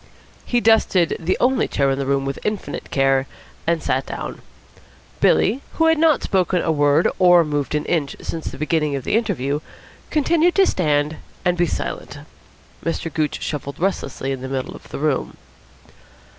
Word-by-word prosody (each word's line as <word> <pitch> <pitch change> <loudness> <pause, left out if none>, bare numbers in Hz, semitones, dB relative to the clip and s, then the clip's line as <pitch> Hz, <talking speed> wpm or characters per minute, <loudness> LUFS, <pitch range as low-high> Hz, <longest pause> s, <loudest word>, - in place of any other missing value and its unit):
He 240 -1 +2
dusted 220 -6 +3
the 175 +3 0
only 255 +1 +2
chair 140 -1 +1
in 135 - -1
the 135 - -2
room 140 0 +1
with 135 0 -3
infinite 210 -2 -4
care 135 -1 +2 0.4
and 170 -1 +1
sat 130 +1 0
down. - - -6 0.8
Billy - - +4
Windsor, 255 +7 -4
who 325 - +2
had 325 -1 +4
not 320 -3 +4
spoken 185 -1 +1
a 160 - +1
word 145 +1 +3
or 175 -2 +6
moved 145 -1 -2
an 150 - -1
inch 155 -5 -1
since 165 -1 -5
the - - -6
beginning 155 -1 0
of 135 - -4
the - - 0
interview, 150 - 0 0.5
continued 335 +3 +2
to 390 - +5
stand 150 - +1 0.3
and 180 0 +3
be 175 0 +2
silent. - - -4 0.7
Mr. 165 -1 -3
Gooch 155 -1 -1
shuffled 140 -2 -4
restlessly 140 -7 -2
in 135 -2 -4
the 130 - -5
middle 130 -1 -3
of - - -14
the - - -6
room. 150 -2 -1
160 Hz, 175 wpm, -21 LUFS, 140-195 Hz, 0.8 s, or